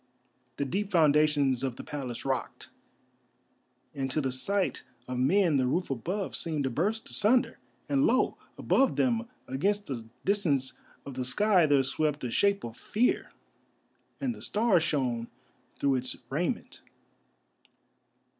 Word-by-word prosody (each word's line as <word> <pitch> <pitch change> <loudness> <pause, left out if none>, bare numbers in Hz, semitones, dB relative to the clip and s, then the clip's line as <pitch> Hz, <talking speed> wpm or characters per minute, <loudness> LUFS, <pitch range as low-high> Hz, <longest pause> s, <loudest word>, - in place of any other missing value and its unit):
The 140 - -1
deep 195 +8 -2
foundations 150 -6 +3
of 130 -3 -2
the - - -8
Palace 130 -5 -6
rocked, 130 -4 -3 1.2
and 135 -2 -3
to 145 - 0
the 135 -3 -1
sight 195 +10 -1 0.3
of 125 -1 -3
men 170 +3 +3
the 130 -1 +2
roof 175 +4 -1
above 180 - -3
seemed 155 -4 -1
to 130 - -1
burst 210 - -1
asunder, 235 +3 +3 0.3
and 140 -1 +3
lo! 255 +3 +2 0.2
above 270 -1 +2
them, 235 -2 +1 0.2
against 200 +10 0
the 120 -7 -6 0.2
distance 155 -10 +1 0.3
of 140 - -7
the 130 0 -3
sky, 185 +5 +3
there 140 -2 +4
swept 150 +2 -1
a 125 - -2
shape 200 +8 +2
of 115 0 -7
Fear, 235 +4 0 0.9
and 265 -3 -1
the - - -12
stars 210 -5 +2
shone 125 -7 -1 0.5
through 140 -2 +1
its 125 0 -3 0.2
raiment. 175 - -2
150 Hz, 140 wpm, -29 LUFS, 130-200 Hz, 1.2 s, there